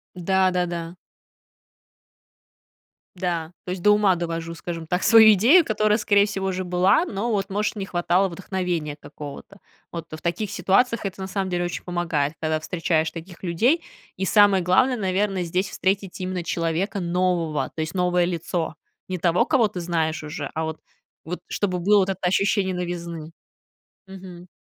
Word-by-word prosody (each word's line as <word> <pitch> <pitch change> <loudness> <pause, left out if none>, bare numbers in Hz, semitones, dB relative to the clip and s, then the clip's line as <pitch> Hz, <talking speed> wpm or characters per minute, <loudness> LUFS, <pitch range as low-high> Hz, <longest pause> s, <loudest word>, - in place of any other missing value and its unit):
Да-да-да. 180 -2 0 2.2
Да. 175 -3 -2
То 180 - -4
есть 185 - -4
до 210 +3 +5
ума 210 -3 +4
довожу, 165 -1 -4
скажем 165 0 -6
так, 180 +3 -1
свою 220 -2 +8
идею, 265 - +5
которая, 215 -1 +2
скорее 205 -2 +3
всего, 195 -2 -3
уже 185 0 -2
была, 180 - +3
но 230 - -3
вот, 200 -2 -1
может, 210 +3 -1
не 195 -2 -4
хватало 180 +2 +1
вдохновения 175 -4 -3
какого-то. 150 +5 -10 0.3
Вот 170 -1 -6
в 155 - -8
таких 175 +4 -2
ситуациях 215 +5 +1
это 190 0 -5
на 190 - -4
самом 190 -1 -2
деле 175 0 -1
очень 175 - -5
помогает, 165 -5 -1
когда 155 -1 0
встречаешь 160 -1 0
таких 170 +1 -10
людей, 235 - +2 0.3
и 190 - -1
самое 200 -1 +5
главное, 250 +9 +3
наверное, 195 -1 0
здесь 180 +3 -1
встретить 195 0 -1
именно 185 -1 -3
человека 170 +5 -1
нового, 175 -3 0
то 160 - -4
есть 155 0 -4
новое 180 -1 +2
лицо. 170 -1 -3 0.3
Не 185 - -3
того, 175 +6 +2
кого 260 -6 +3
ты 190 - -7
знаешь 165 -2 -1
уже, 150 0 -5
а 160 - -2
вот 160 0 -5 0.4
вот, 180 +3 -5
чтобы 185 -3 -1
было 205 +4 +4
вот 190 0 +1
это 190 -1 -3
ощущение 190 +1 +1
новизны. 170 -3 -5 0.8
Мгм. 185 -2 -11
180 Hz, 160 wpm, -23 LUFS, 170-195 Hz, 2.2 s, свою